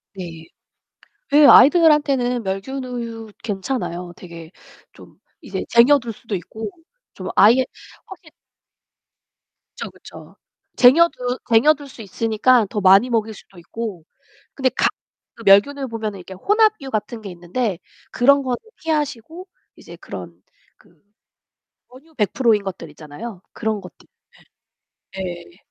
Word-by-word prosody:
네. 165 -3 -9 0.8
그 290 0 +7
아이들한테는 275 -5 +5
멸균 200 +8 -4
우유 230 -3 -7
괜찮아요, 190 -5 -4
되게 170 -2 -11 0.4
좀 - - -17 0.2
이제 - - -5
쟁여둘 240 0 +4
수도 215 -1 -6
있고. 220 - -7 0.4
좀 - - -8
아예 245 +5 +5 0.4
확실 350 -5 -14 1.5
그쵸, - - -6
그쵸. - - -14 0.4
쟁여두 255 -2 +4
쟁여둘 285 +5 +3
수 255 -4 -12
있으니까 225 +3 +2
더 210 - -3
많이 195 +6 +5
먹일 220 -2 -1
수도 195 -2 -17
있고 195 -1 -7 0.5
근데 265 -2 +1
각 - - +2 0.5
그 230 - -13
멸균우유 265 +8 +4
보면은 215 -4 -5
이렇게 190 +1 -11
혼합유 415 - +1
같은 220 +1 -4
게 200 - -8
있는데 180 +3 -3 0.3
그런 280 +3 +4
거는 250 -2 -2 0.2
피하시고 315 - -4 0.3
이제 - - -13
그런 - - -10 0.3
그 - - -25 1.0
원유 285 +6 -19
100% 230 +1 +2
인 205 -1 0
것들 175 -4 -7
있잖아요, 170 +7 -10
그런 220 -2 -2
것들. 180 -7 -15 1.1
예. - - -3
예. 175 0 -11
230 Hz, 250 characters per minute, -20 LUFS, 195-270 Hz, 1.5 s, 그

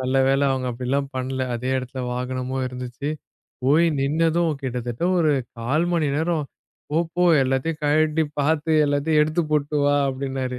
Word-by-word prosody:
நல்லவேளை 135 +2 +2
அவுங்க 130 -1 -2
அப்படி 125 +1 -6
எல்லாம் 140 +1 0
பண்ணல. 130 +1 -2
அதே 125 +2 -3
இடத்துல 130 0 -6
வாகனமும் 130 +1 -3
இருந்துச்சு. 125 +2 -6 0.6
போய் 155 +6 +4
நின்னதும் 165 +4 +1
கிட்டத்தட்ட 125 +2 -3
ஒரு 155 -3 +3 0.3
1/4 135 +8 +1
மணி 160 -4 +1
நேரம், 160 -1 0 0.5
"போ 155 - +1 0.2
போ 180 0 +2 0.2
எல்லாத்தையும் 135 +5 -1
கழட்டி 155 +1 +2 0.2
பார்த்து 160 +2 +1
எல்லாத்தையும் 145 +2 +2
எடுத்து 155 +3 0
போட்டு 150 0 0
வா" 145 0 +3
அப்படின்னாரு 130 -1 -3
140 Hz, 145 wpm, -23 LUFS, 130-155 Hz, 0.6 s, போய்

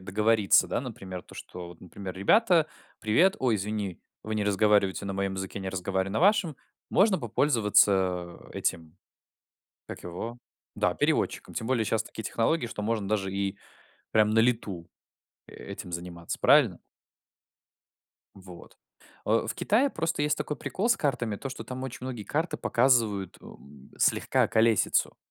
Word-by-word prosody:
договориться. 105 +2 +3
Да, - - -1
например, 95 -8 -7
то, - - -16
что, 90 -1 -9
вот, 85 - -14
например: 95 +1 -8
"Ребята, 170 - +4 0.3
привет. 165 - +3
Ой, 120 -4 +2
извини, 100 -2 -3 0.2
вы 110 0 -4
не 105 - 0
разговариваете 105 -1 +2
на 100 - -3
моем 95 0 -2
языке, 95 +1 -5
я - - -7
не 95 - -3
разговариваю 95 +1 -2
на - - 0
вашем. 190 - +3 0.3
Можно 195 -2 +4
попользоваться 100 - +2
этим, 80 +1 -3 0.9
как - - -8
его? 110 +8 -6 0.4
Да, - - +1
переводчиком". - - -1
Тем 110 - -3
более 120 -3 +1
щас 110 +1 0
такие 110 - -9
технологии, 120 +6 0
что 110 -2 -6
можно 105 -2 -1
даже 95 -3 -1
и 100 0 -2 0.5
прям 110 0 +4
на 115 - +3
лету, 110 -8 0 0.6
этим 90 - -9
заниматься, 85 0 -5
правильно? - - +5 1.6
Вот, 90 -3 -13 0.5
э, - - +2
в - - -3
Китае 255 +7 +2
просто 165 -1 -2
есть 150 0 +1
такой 150 - -3
прикол 205 +5 -2
с 230 - +4
картами 120 -7 -1
то, 135 - -6
что 130 - -7
там 130 0 -6
очень 130 - -6
многие 120 -5 -5
карты 160 +3 -1
показывают, 115 -7 +1
эм, 70 -1 -15
слегка - - +2
околесицу. 110 -1 +2
105 Hz, 150 wpm, -28 LUFS, 95-125 Hz, 1.6 s, правильно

